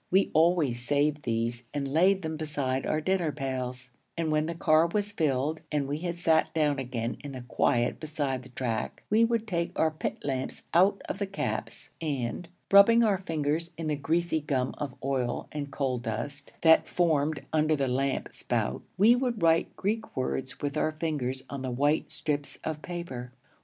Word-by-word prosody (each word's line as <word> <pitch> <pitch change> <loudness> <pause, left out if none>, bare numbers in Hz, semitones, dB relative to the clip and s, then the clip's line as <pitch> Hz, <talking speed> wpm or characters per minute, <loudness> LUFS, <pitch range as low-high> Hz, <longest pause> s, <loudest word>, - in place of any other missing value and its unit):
We 190 +2 +3
always 160 -6 +3
saved 145 +3 +1
these 115 0 -1
and 140 -1 -1
laid 190 +4 +4
them 160 0 -3
beside 145 -4 -2
our 155 - +1
dinner 180 -2 +1
pails; 130 -2 -4 0.3
and 165 -2 0
when 155 0 +2
the 170 - -3
car 160 0 +4
was 205 +3 -1
filled 155 -4 0
and 145 -2 0
we 145 +2 -2
had 175 0 -3
sat 165 -2 +3
down 150 -3 +2
again 120 -2 -3
in 145 -1 -6
the 130 -1 -7
quiet 120 -1 +1
beside 145 -4 -2
the 125 - -14
track, 120 -3 -3
we 220 +2 +5
would 230 -1 +1
take 170 -4 -2
our 160 - +3
pit 155 - -3
lamps 130 -2 -3
out 190 +4 +4
of 200 - -4
our 200 - 0
caps 195 - -4
and, 145 +2 -3 0.2
rubbing 230 +4 +8
our 205 -4 +3
fingers 160 -2 -1
in 160 -1 -3
the 150 - +1
greasy 160 +3 0
gum 135 -3 -1
of 140 -3 -4
oil 130 -3 -1
and 145 -2 -4
coal 130 -3 -1
dust 130 +6 -5
that 160 -1 +6
formed 155 -4 +1
under 155 0 +3
the 140 -2 0
lamp 135 +2 0
spout, - - -2 0.2
we 220 +5 +7
would 245 -6 -1
write 165 0 +3
Greek 220 +3 -2
words 130 0 -2
with 145 +1 -2
our 155 - +1
fingers 145 -5 -2
on 140 -1 -6
the 130 - -3
white 145 +5 +1
strips 145 -2 -2
of 155 -1 -3
paper. 150 -9 -6
150 Hz, 185 wpm, -28 LUFS, 130-170 Hz, 0.3 s, rubbing